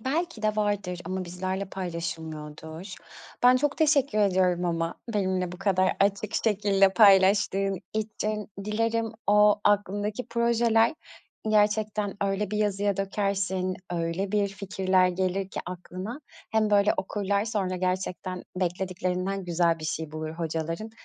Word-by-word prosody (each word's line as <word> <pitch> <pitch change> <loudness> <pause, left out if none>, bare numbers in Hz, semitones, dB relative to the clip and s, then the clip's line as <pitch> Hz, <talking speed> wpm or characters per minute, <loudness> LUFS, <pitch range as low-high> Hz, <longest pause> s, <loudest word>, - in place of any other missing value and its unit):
Belki 280 -1 -2
de 215 0 +1
vardır 205 -4 -1
ama 185 0 -3
bizlerle 185 +2 -3
paylaşılmıyordur. 160 -1 -6 0.5
Ben 250 +1 +7
çok 290 +2 0
teşekkür 280 -7 +3
ediyorum 185 -3 +2
ama 165 -1 -1 0.2
benimle 185 -3 0
bu 180 - -9
kadar 185 -2 +2
açık 200 +2 +1
şekilde 200 -2 +4
paylaştığın 195 -1 +4
için. 215 -1 -3 0.2
Dilerim 225 +1 0
o 210 0 +5
aklındaki 205 +2 0
projeler 235 +1 +3 0.5
gerçekten 210 -1 +1
öyle 195 0 -1
bir 210 - -2
yazıya 205 -1 +1
dökersin, 195 -2 -1
öyle 175 +4 -2
bir 205 -1 +2
fikirler 190 -2 +1
gelir 185 +1 -1
ki - - -4
aklına 185 - -6 0.3
hem 215 -1 +2
böyle 205 0 +4
okurlar, 200 +1 -1
sonra 195 -5 -1
gerçekten 185 0 -3
beklediklerinden 185 +1 -2
güzel 170 -1 +1
bir 155 - -8
şey 155 0 -3
bulur 155 0 -4
hocaların 165 +5 -4
195 Hz, 125 wpm, -27 LUFS, 180-210 Hz, 0.5 s, Ben